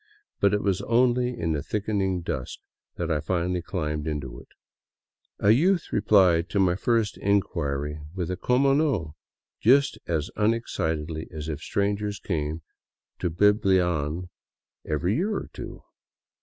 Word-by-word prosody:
But 100 - +4
it 105 - -2
was 100 -1 +1
only 125 +2 +2
in 80 -1 0
the 75 -2 -1
thickening 95 -3 -1
dusk 70 -7 -4 0.4
that 85 -1 -2
I 75 - +1
finally 90 +2 -1
climbed 75 -3 -3
into 70 -6 -4
it. - - -16 0.9
A 100 - +4
youth 170 - +2
replied 90 -5 +4
to 100 - 0
my 90 -2 +4
first 110 +2 0
inquiry 75 -7 -1
with 90 -1 -2
a - - -1
como 135 +7 +2
no! 135 - 0
" - - -68
— - - -68
just 140 +5 +4
as 80 -2 -1
un 110 +2 +3
excitedly 80 -7 -3
as 75 -1 -6
if 75 -1 -4
strangers 100 +1 -1
came 80 -4 -3 0.6
to 90 - 0
Biblian 90 -4 +2 0.5
every 85 +6 0
year 205 +4 0
or - - -5
two. - - -8
90 Hz, 150 wpm, -26 LUFS, 80-105 Hz, 0.9 s, But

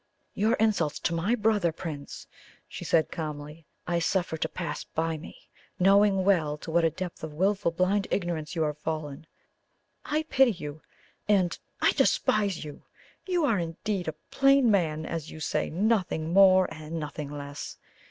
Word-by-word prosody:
"Your 220 +4 +2
insults 210 - +1
to 170 - 0
my 180 +8 +1
brother, 210 -6 +2
Prince," 155 -4 -7 0.4
she - - -8
said 160 -2 +2
calmly, 150 -1 -6 0.2
"I 170 0 0
suffer 175 0 0
to 160 0 -2
pass 175 -2 -4
by 160 0 -2
me, 155 - -10 0.4
knowing 195 +1 +4
well 160 -7 +2
to 160 - -8
what 170 +1 +3
a 165 - +4
depth 180 +1 -7
of 155 -1 -6
wilful 195 +2 +2
blind 185 +4 +1
ignorance 175 -3 -2
you 160 - +1
are 150 -1 0
fallen. 155 -1 -5 0.8
I 305 +1 -1
pity 265 -6 +3
you 150 -4 -8 0.5
and 185 -4 +3 0.3
I - - +6
despise 200 -6 +1
you! 150 - -9 0.5
You 355 -4 +2
are 225 -9 +2
indeed 175 +3 -3
a 160 - -3 0.2
plain 275 -3 +5
man, 160 -5 +1
as 165 -2 -4
you 160 - -9
say 155 - -1
nothing 180 -4 0
more 190 -1 +7
and 155 +1 -6
nothing 150 -1 -5
less. 145 0 -7
170 Hz, 160 wpm, -28 LUFS, 155-200 Hz, 0.8 s, more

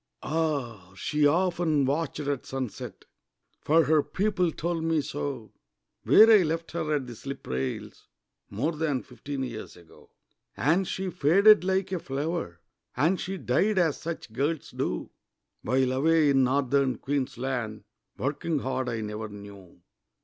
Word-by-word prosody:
Ah! 135 - -2
she 150 +8 +2
often 170 -3 +2
watched 150 +2 -1
at 140 -2 -3
sunset 130 -4 -6 0.6
For 160 +2 +4
her 155 +1 +4
people 185 0 0
told 165 +1 -2
me 165 -1 +2
so 135 -6 -4 0.5
Where 220 - +8
I 215 -3 +8
left 165 0 -2
her 155 -2 -1
at 140 -3 -2
the 120 -1 -9
slip 135 +4 -8
rails 65 0 -4 0.4
More 125 +11 -1
than 150 -5 -1
fifteen 135 +3 -6
years 110 -7 -7
ago. 85 -2 -18 0.5
And 170 +8 +2
she 190 -1 -3
faded 195 +6 +5
like 190 0 0
a 185 - -1
flower, 140 - -4 0.4
And 165 +8 +2
she 195 +1 -4
died, 185 +9 +1
as 165 -5 +2
such 165 -9 -6
girls 145 +5 -2
do, - - -3 0.5
While, 130 +2 +1
away 155 +2 +3
in 135 -1 +4
Northern 135 -1 +1
Queensland, 130 -5 -3 0.3
Working 150 +4 -1
hard, 130 -1 -2
I 115 -1 -3
never 105 0 -5
knew. 100 -3 -12
145 Hz, 140 wpm, -27 LUFS, 125-165 Hz, 0.6 s, Where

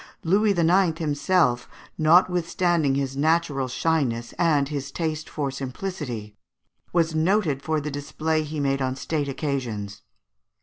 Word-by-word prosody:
Louis 200 +6 +3
IX. 170 0 +3
himself, 145 -4 +1 0.3
notwithstanding 170 -2 +3
his 135 -1 -2
natural 150 -2 +1
shyness 130 -4 -1
and 150 -5 +3
his 140 -1 -4
taste 160 -2 -3
for 140 -3 -2
simplicity, 130 - -5 0.6
was 165 -2 +2
noted 160 -3 +1
for 155 +2 0
the 150 0 -4
display 155 +3 -1
he 155 0 -5
made 135 -1 0
on 130 0 -1
state 145 +1 -2
occasions. 115 -8 -3
150 Hz, 125 wpm, -24 LUFS, 135-165 Hz, 0.6 s, Louis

